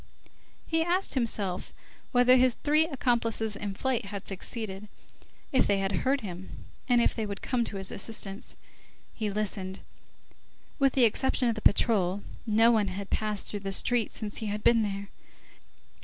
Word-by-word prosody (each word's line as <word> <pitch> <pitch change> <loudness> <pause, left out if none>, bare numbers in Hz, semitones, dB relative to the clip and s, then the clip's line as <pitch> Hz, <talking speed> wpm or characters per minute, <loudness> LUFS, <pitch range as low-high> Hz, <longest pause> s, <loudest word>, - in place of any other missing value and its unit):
He 325 0 0
asked 360 +3 +1
himself 205 -7 -1 0.4
whether 245 +1 +5
his 255 -1 +4
three 305 +2 +2
accomplices 230 -6 0
in 200 -1 -5
flight 255 -1 -1
had 200 -1 -7
succeeded, 200 0 -5 0.6
if 260 - +3
they 200 - +2
had 195 0 -1
heard 270 +7 0
him, 185 -3 -8 0.2
and 240 -1 +5
if - - +2
they 220 -2 -3
would 200 -1 -6
come 250 -2 0
to 200 - -4
his 195 -1 0
assistance. 200 -2 -2 0.6
He 215 -2 -3
listened. 195 -2 -3 1.0
With 275 -2 +3
the 260 - +3
exception 250 +2 +2
of - - +1
the 215 - -6
patrol, 200 -3 +2 0.2
no 225 +2 +5
one 215 -3 +2
had 195 +1 -6
passed 210 -2 0
through 205 - -4
the 195 -1 -4
street 235 +3 +3
since 210 -2 -3
he 220 - -3
had 210 +1 -3
been 235 -1 +5
there. 200 -1 -3
215 Hz, 165 wpm, -28 LUFS, 200-245 Hz, 1.0 s, whether